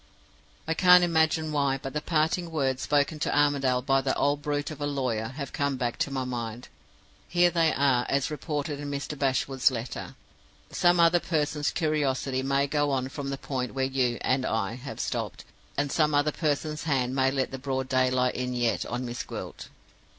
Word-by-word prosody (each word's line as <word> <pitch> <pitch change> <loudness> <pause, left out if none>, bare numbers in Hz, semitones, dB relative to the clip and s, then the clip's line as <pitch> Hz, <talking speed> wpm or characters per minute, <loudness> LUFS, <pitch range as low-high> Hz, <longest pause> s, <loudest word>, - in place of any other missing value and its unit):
"I 160 - +1
can't 180 +1 +7
imagine 160 -2 +2
why, 140 -2 +1
but 135 0 -7
the 150 - -1
parting 165 +2 0
words 135 -5 -1
spoken 145 +1 +1
to - - 0
Armadale 135 -4 +2
by 135 0 +3
that 135 0 -1
old 145 +1 +1
brute 145 +1 -2
of 150 -1 -9
a 145 - 0
lawyer 125 -6 -1
have 140 +2 -7
come 140 -1 0
back 120 -2 -2
to - - 0
my 135 -1 -2
mind! 120 -2 -5 0.6
Here 175 0 +4
they 165 -2 +3
are, 130 -3 +2
as 140 +1 0
reported 150 -1 -3
in 145 0 -5
Mr. 140 +1 -4
Bashwood's 135 -1 +2
letter: 120 -1 -6 0.6
'Some 175 0 +3
other 170 +1 +5
person's 150 -3 0
curiosity 140 -5 0
may 135 +1 +1
go 145 0 0
on 130 -1 -1
from 140 0 -5
the 135 - -3
point 130 -2 -4
where 135 -1 +1
you 130 -3 0
(and 130 +1 +1
I) 110 -3 -1
have 130 +3 -8
stopped, - - -3 0.3
and 145 0 0
some 150 -2 +2
other 145 +1 +3
person's 150 0 -2
hand 130 -4 0
may 135 0 +3
let 135 -1 -1
the 135 - -5
broad 130 -1 -2
daylight 130 -1 +2
in 125 0 -3
yet 120 -2 0
on 125 +1 -3
Miss 120 0 -4
Gwilt. - - -7
140 Hz, 190 wpm, -27 LUFS, 130-150 Hz, 0.6 s, can't